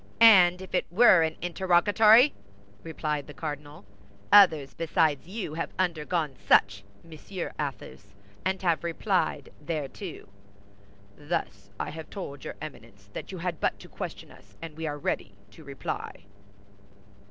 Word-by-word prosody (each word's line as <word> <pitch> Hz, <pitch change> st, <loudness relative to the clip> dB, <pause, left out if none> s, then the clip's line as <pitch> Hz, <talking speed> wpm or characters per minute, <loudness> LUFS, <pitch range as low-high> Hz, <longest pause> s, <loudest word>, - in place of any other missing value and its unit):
"And 190 Hz, -5 st, +7 dB
if 190 Hz, -, -13 dB
it 180 Hz, -, 0 dB
were 190 Hz, -3 st, +6 dB
an 160 Hz, 0 st, -1 dB
interrogatory!" 205 Hz, -, +5 dB, 0.5 s
replied 150 Hz, -2 st, -4 dB
the 150 Hz, -, -11 dB
cardinal. 150 Hz, +2 st, -7 dB, 0.5 s
"Others 160 Hz, -10 st, +6 dB
besides 160 Hz, -2 st, 0 dB
you 190 Hz, -5 st, -5 dB
have 165 Hz, +1 st, -3 dB
undergone 165 Hz, -4 st, -1 dB
such, 100 Hz, 0 st, +4 dB, 0.2 s
Monsieur 170 Hz, +3 st, -7 dB
Athos, 100 Hz, -8 st, -6 dB, 0.3 s
and 190 Hz, 0 st, -1 dB
have 170 Hz, -3 st, +1 dB
replied 170 Hz, -4 st, -1 dB
thereto." 160 Hz, +3 st, -5 dB, 0.9 s
"Thus 145 Hz, -, -4 dB
I -, -, -3 dB
have 160 Hz, +1 st, -9 dB
told 145 Hz, -8 st, -7 dB
your -, -, -6 dB
Eminence -, -, -11 dB
that -, -, -7 dB
you -, -, -7 dB
had -, -, -4 dB
but -, -, 0 dB
to -, -, -12 dB
question -, -, -8 dB
us, -, -, -19 dB
and 165 Hz, -2 st, -8 dB
we 160 Hz, 0 st, -4 dB
are 145 Hz, -1 st, -3 dB
ready 100 Hz, -8 st, -3 dB, 0.2 s
to 100 Hz, -, -15 dB
reply." 140 Hz, -1 st, -6 dB
165 Hz, 140 wpm, -27 LUFS, 145-185 Hz, 0.9 s, And